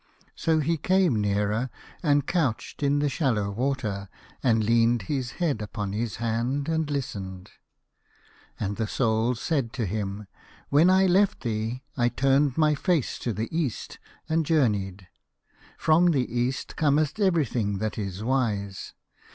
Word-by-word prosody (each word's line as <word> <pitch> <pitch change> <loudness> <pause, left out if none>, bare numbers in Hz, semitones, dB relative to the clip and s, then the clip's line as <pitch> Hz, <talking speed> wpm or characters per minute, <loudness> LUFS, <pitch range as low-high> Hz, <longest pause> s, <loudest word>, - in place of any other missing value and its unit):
So 160 -1 +1
he 165 +3 0
came 180 - +2
nearer, 105 +4 0 0.3
and 145 -4 +2
couched 145 -10 -1
in 140 0 +2
the 145 0 +1
shallow 120 -8 0
water, 110 -5 -2 0.3
and 115 -4 +3
leaned 115 0 +3
his 130 +1 -3
head 150 -11 -1
upon 105 -1 -4
his 110 +1 -2
hand 120 +5 -1
and 160 -2 0
listened. 95 -10 -5 1.1
And 100 -1 -2
the 110 - -1
Soul 115 +1 +1
said 125 -2 -1
to 115 - -2
him, 100 +1 -3 0.2
" - - -26
When 155 +5 +6
I 190 +1 +5
left 195 +2 +3
thee 115 +2 -3
I 120 -2 +2
turned 135 +2 +2
my 155 -1 +4
face 155 -1 0
to 120 - -2
the 110 - -4
East 155 -9 -3 0.3
and 160 +1 +1
journeyed. 100 - 0 0.7
From 165 +3 +4
the 135 -6 +2
East 125 +2 -1
cometh 150 +3 +1
every 175 -7 +3
thing 105 -4 -1
that 110 +2 -3
is 100 0 -4
wise. 105 -6 -1
125 Hz, 150 wpm, -26 LUFS, 105-150 Hz, 1.1 s, When